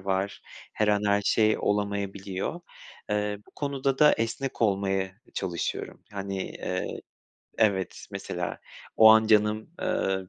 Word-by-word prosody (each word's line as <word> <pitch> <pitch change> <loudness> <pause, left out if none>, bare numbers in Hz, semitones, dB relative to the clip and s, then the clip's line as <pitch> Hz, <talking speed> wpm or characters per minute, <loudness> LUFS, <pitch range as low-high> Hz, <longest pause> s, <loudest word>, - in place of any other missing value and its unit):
var, 95 +1 -2 0.3
her 105 - +1
an 105 0 +3
her 100 0 +3
şey 110 +1 +3
olamayabiliyor. 100 - -2 0.5
Eee, 105 0 0
bu - - -20
konuda 140 -2 -2
da 150 0 +7
esnek 115 +3 -2
olmaya 95 -2 +2
e, 95 +5 -13
çalışıyorum. 85 -2 -3
Hani, 100 -1 -4
eee - - -4 0.6
Evet, 100 -4 +1
mesela - - -4 0.4
o 110 - +9
an 110 0 +6
canım, 110 +1 +3
ııı, 95 - -1
105 Hz, 130 wpm, -27 LUFS, 95-110 Hz, 0.6 s, o